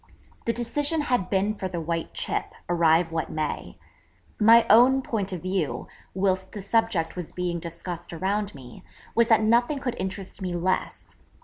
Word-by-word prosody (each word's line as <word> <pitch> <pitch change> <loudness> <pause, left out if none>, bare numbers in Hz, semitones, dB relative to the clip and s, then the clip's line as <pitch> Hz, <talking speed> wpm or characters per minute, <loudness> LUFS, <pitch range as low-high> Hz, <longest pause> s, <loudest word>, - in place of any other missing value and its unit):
The 230 - +2
decision 290 +7 0
had 245 -9 0
been 200 +2 +1
for 195 -3 -4
the 180 -2 -4
white 165 0 -3
chip, - - -2
arrive 165 -1 +3
what 165 -1 -2
may. 155 -1 -4 0.6
My 230 +2 +7
own 260 +4 +6
point 205 -5 -2
of 180 -2 -5
view, 185 -5 -2 0.3
whilst 190 -1 0
the 205 - -5
subject 200 -6 +1
was 180 -3 -6
being 175 -1 -2
discussed 170 +1 -7
around 195 +3 -2
me, 125 -3 -12 0.3
was 235 0 +4
that 220 -2 +4
nothing 240 +6 +3
could 260 -3 -3
interest 190 +1 -5
me 180 -2 -2
less. 185 +2 -2
190 Hz, 165 wpm, -26 LUFS, 170-225 Hz, 0.6 s, My